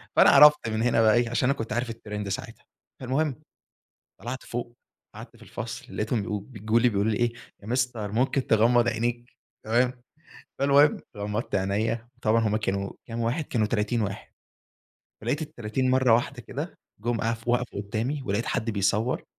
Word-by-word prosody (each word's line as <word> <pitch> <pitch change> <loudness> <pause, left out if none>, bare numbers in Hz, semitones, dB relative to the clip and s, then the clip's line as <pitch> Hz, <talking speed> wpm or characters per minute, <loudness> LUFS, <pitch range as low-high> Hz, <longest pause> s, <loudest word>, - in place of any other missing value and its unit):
فأنا - - +7
عرفت 150 -3 +7
من 110 0 -1
هنا 120 -2 +3
بقى 110 -1 +5
إيه، 120 -1 +2
علشان 120 +2 +1
أنا 140 - +1
كنت 115 -1 -4
عارف 120 0 -1
الtrend 105 -2 -6
ساعتها، 95 - -6 0.3
فالمُهم 135 +2 -1 0.8
طلعت 125 +4 -5
فوق، 120 0 -5 0.4
قعدت - - -11
في - - -15
الفصل، - - -7
لقيتهم 110 +1 0 0.2
بي 105 +3 -12
بيجولي، 115 +4 +3
بيقولوا 105 0 +1
لي 105 - 0
إيه 120 -1 +1 0.3
يا - - -10
Mister 125 0 0
ممكن 115 +6 0
تغمَّض 120 +2 +4
عينيك؟ 120 +1 -2 0.3
تمام، 125 +2 +1 0.6
فالمُهم 140 +2 +5 0.2
غمضت 105 +3 -3
عينيا، 105 +4 -1
طبعًا 115 +1 +3
هُم 105 0 +1
كانوا 100 -2 -2 0.2
كام 115 0 -5
واحد، 120 +8 0
كانوا 110 -5 0
30 110 +2 0
واحد، 100 -1 -5 0.9
ولقيت 130 +7 -1
ال30 130 -4 -2
مرّة 130 -3 +4
واحدة 120 - -1
كده - - -6 0.3
جُم 120 +1 -1
اف 115 +1 -2
وقفوا 120 -3 0
قدامي، 115 +8 -3
ولقيت 105 +2 -1
حد 110 +1 -1
بيصوّر، 105 +4 0
115 Hz, 165 wpm, -26 LUFS, 110-125 Hz, 0.9 s, فأنا